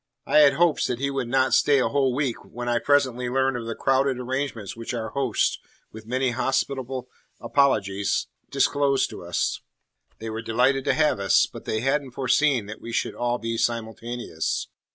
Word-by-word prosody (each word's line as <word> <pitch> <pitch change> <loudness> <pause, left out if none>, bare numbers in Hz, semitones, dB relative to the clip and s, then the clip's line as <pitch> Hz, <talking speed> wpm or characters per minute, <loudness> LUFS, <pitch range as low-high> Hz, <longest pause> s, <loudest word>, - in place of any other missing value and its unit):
I - - +4
had 145 -2 +7
hopes 165 +1 +2
that 125 - -2
he 140 +2 -1
would 135 -3 -2
not 130 0 +2
stay 145 -1 +4
a - - +2
whole 135 -3 +1
week 135 -4 -2
when 120 +1 -7
I 120 -1 +2
presently 130 -4 +1
learned 135 +1 +1
of 115 -2 -5
the 115 - -3
crowded 135 -1 +1
arrangements 125 -4 -3
which 115 +2 -5
our 115 -1 -3
hosts, 135 -5 0 0.3
with 110 0 -11
many 130 +1 0
hospitable 130 0 -2 0.3
apologies, 100 -8 +1 0.2
disclosed 140 -2 +2
to - - -9
us. - - -1 0.6
They 110 0 -6
were 110 +1 -4
delighted 125 +4 +1
to 140 -2 +2
have 150 -5 +2
us, 95 -1 +4
but - - -11
they 110 - -1
hadn't 135 0 0
foreseen 130 -1 +2
that 105 +2 -9
we 115 - -7
should - - -1
all 120 0 -1
be 115 -1 -3
simultaneous. 115 -5 -3
125 Hz, 180 wpm, -25 LUFS, 115-135 Hz, 0.6 s, had